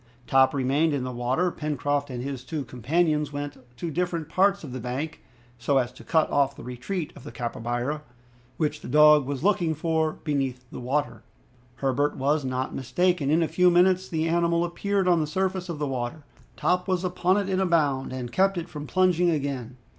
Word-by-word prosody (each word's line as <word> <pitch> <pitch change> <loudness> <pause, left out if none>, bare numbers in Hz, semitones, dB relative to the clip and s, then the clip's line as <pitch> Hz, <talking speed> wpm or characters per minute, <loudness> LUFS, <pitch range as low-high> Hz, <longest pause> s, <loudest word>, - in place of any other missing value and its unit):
Top 135 0 +4
remained 140 +4 +2
in 135 - -2
the 130 - -3
water. 125 +9 0
Pencroft 145 -2 -2
and 125 -1 -5
his 135 -2 -5
two 150 0 -4
companions 150 +5 0
went 145 0 -5 0.2
to 170 +4 -4
different 170 -1 -2
parts 195 +2 +2
of 140 - -7
the 130 - -5
bank, 130 +7 -4 0.4
so 135 +4 +1
as 125 -2 +1
to - - -14
cut 160 -1 +2
off 140 -1 +2
the - - -10
retreat 130 +8 -4
of 140 - -12
the - - -8
capybara, 120 +5 -3 0.6
which 155 -2 -1
the - - -8
dog 150 0 +6
was 140 0 -3
looking 175 -5 +2
for 160 0 0
beneath 135 -4 -2
the - - -7
water. 140 +4 -2 0.5
Herbert 135 +2 0
was 145 +2 +1
not 130 0 -2
mistaken. 145 +3 0
In 165 +3 +3
a - - 0
few 180 +3 +4
minutes 185 +1 +3
the 160 -1 0
animal 170 0 +2
appeared 195 +2 -1
on 175 -2 +4
the 155 - -1
surface 185 +2 -1
of 170 - -3
the 150 - -1
water. 130 +3 -4 0.3
Top 180 +1 +1
was 185 -1 0
upon 180 +1 +1
it 200 -2 0
in 190 -1 0
a 190 - +2
bound, 145 -6 +1
and 125 -2 -5
kept 195 +3 +2
it 170 0 -3
from 150 -2 -7
plunging 180 -2 +3
again. 135 -6 -2
150 Hz, 200 wpm, -26 LUFS, 130-175 Hz, 0.6 s, dog